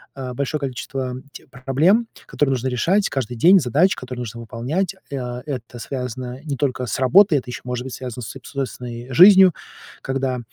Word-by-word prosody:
э, 130 -2 -6
большое 140 +4 -2
количество 130 -1 -4 0.2
тех - - -13
проблем, 150 - +2 0.2
которые 145 -2 0
нужно 130 +1 -1
решать 180 - +1
каждый 125 -3 -3
день, 180 - +6
задач, 155 - +2
которые 125 -1 -7
нужно 115 0 -6
выполнять. 135 - -3 0.2
А, 125 -2 -4
это 125 -4 -6
связано 125 0 -5
не 140 -2 -2
только 130 -2 -1
с - - -2
работой, 155 +6 +5
это 125 - -5
еще 120 - -6
может 125 0 -3
быть 130 - -7
связано 125 -2 -6
с - - -6
соб 135 - -11
с - - -10
собственной 125 -2 -5
жизнью, 190 +2 +8 0.5
когда 135 -1 -2
130 Hz, 180 wpm, -21 LUFS, 125-145 Hz, 0.5 s, жизнью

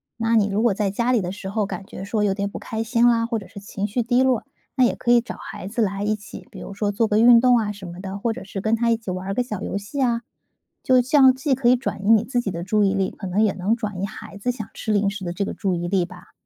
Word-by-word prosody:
那 230 0 +1
你 205 -2 +3
如 205 +2 0
果 235 -4 +3
在 200 0 0
家 235 +5 0
里 245 - +3
的 180 -2 -3
时 195 -1 -7
候 210 +1 0
感 195 0 -6
觉 190 - -8
说 210 +1 -1
有 200 -2 +2
点 200 0 -2
不 - - -7
开 220 0 -4
心 230 +1 +2
啦， 230 -1 +3
或 230 -1 -2
者 195 - -12
是 200 0 -10
情 200 0 -4
绪 235 +4 -1
低 245 +2 +3
落， 260 -3 +1 0.3
那 255 - +4
也 - - +1
可 240 - 0
以 240 - +7
找 235 - -6
孩 185 - -8
子 230 +4 -2
来 200 -1 -1
一 215 +1 +1
起， 210 -1 -11
比 - - -11
如 - - -8
说 205 0 -1
做 225 +3 +1
个 210 - +2
运 235 0 +7
动 250 -1 +5
啊 210 -2 -1
什 200 -2 -10
么 175 +1 -9
的， 190 +1 -5
或 225 +3 -1
者 225 -3 -7
是 195 0 -5
跟 220 +2 0
他 235 +1 +1
一 230 - +4
起 220 -4 -6
玩 185 +2 -4
个 250 - 0
小 210 -5 -6
游 - - -3
戏 205 +8 -5
啊。 235 -2 +1 0.6
就 255 -1 +4
这 250 +4 0
样 265 -3 +7
既 270 +1 0
可 255 -2 +2
以 250 - +6
转 245 -5 -4
移 200 - 0
你 225 -1 +6
自 245 0 -1
己 215 - -3
的 170 -2 -4
注 210 +3 +2
意 195 0 +2
力， 195 -1 0
可 195 - -8
能 195 +4 +1
也 210 - +2
能 195 +4 0
转 210 -5 -5
移 - - 0
孩 200 - -10
子 245 +5 0
想 220 -4 -7
吃 220 - -3
零 205 -1 +2
食 205 -1 -7
的 175 - -3
这 200 +3 -2
个 - - -4
注 190 -4 -1
意 175 0 -3
力 185 -1 +1
吧。 - - -14
210 Hz, 345 characters per minute, -23 LUFS, 195-235 Hz, 0.6 s, 以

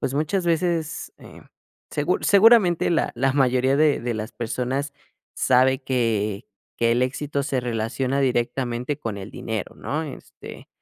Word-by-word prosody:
pues, 135 - -2
muchas 170 +5 -1
veces, 170 -1 -1
eh, - - -14 0.5
segur - - -1
seguramente 200 -5 +5
la 170 - +1
la 135 +2 +1
mayoría 130 0 +2
de 150 -1 +3
de 120 -1 -2
las 110 +1 -5
personas 125 +4 -3 0.4
sabe 130 +1 +3
que 110 -5 -1 0.3
que 115 0 +2
el 120 - +2
éxito 140 +2 -2
se 135 -2 -1
relaciona 125 +3 -2
directamente 125 +1 -1
con 110 -6 -4
el 100 +2 -8
dinero, 115 -3 -5
¿no? 155 +3 -3
Este, 145 - -11
130 Hz, 145 wpm, -23 LUFS, 120-145 Hz, 0.5 s, seguramente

